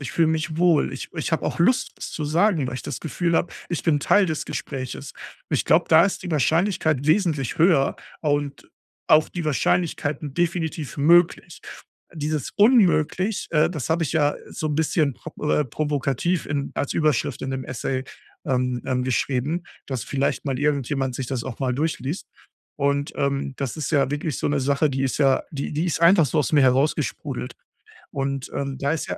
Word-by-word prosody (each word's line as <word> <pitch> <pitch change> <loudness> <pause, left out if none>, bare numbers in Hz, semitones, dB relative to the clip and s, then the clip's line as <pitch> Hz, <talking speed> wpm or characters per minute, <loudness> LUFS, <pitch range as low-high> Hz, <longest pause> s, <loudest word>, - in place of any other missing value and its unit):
ich 140 - -6
fühle 165 -2 +3
mich 160 0 -1
wohl, 170 -3 +3
ich - - -6
ich - - -4
habe - - 0
auch - - -2
Lust, 240 +9 +2
was - - -7
zu 155 - -4
sagen, 165 0 +2
weil 125 - -4
ich 125 - -5
das - - -5
Gefühl 170 +1 -1
habe, - - 0 0.2
ich 175 - -3
bin 155 -4 +2
Teil 205 +6 +4
des 155 -3 -2
Gespräches. 130 -3 -5 0.4
Ich - - 0
glaube, - - +3
da 160 +1 +7
ist 195 - -2
die 180 - -5
Wahrscheinlichkeit 155 - +1
wesentlich 155 - +1
höher 160 -5 +4 0.2
und 145 -2 -2 0.4
auch 155 0 +5
die 175 -2 -5
Wahrscheinlichkeiten 150 -1 0
definitiv 165 -3 -2
möglich. 170 +3 +3 0.5
Dieses 155 -3 -2
Unmöglich, 205 - +3
äh, 155 0 +3
das 150 -8 -4
habe 165 +1 +2
ich 145 - -3
ja 150 -2 +2 0.2
so 155 - -4
'n 150 - -1
bisschen 155 -3 +1
pro 165 - -10 0.2
äh, 150 - +2
provokativ 145 +4 -1
in 140 -1 -2
als 140 - -2
Überschrift 155 -6 0
in 135 - -3
dem 130 0 -3
Essay, 130 +1 -3 0.4
ähm, 125 -1 0
dann 125 -1 0
geschrieben, 130 +6 -1 0.2
dass 130 -4 -4
vielleicht 140 0 -1
mal 135 -3 -2
irgendjemand 140 -2 0
sich 130 - -4
das 125 -2 -3
auch 120 - -6
mal 130 -2 0
durchliest. 155 +3 -2 0.5
Und, 140 0 0
ähm, 140 -1 -1
das 135 -1 -4
ist 155 - -3
ja 140 -4 +2
wirklich 145 0 -2
so - - -1
'ne 145 -1 +1
Sache, 140 +3 +2
die 135 0 -2
ist 135 - -1
ja 135 -2 +3
die 140 -3 -4
die 155 +3 -1
ist 165 - -1
einfach 170 -1 +6
so 155 +4 -1
aus 150 - 0
mir 145 -2 +5
herausgesprudelt. 135 +1 0 0.6
Und, 135 -1 -3
ähm, 140 -1 -3
da 140 0 0
ist 160 - -3
ja - - -4
150 Hz, 190 wpm, -23 LUFS, 135-165 Hz, 0.6 s, da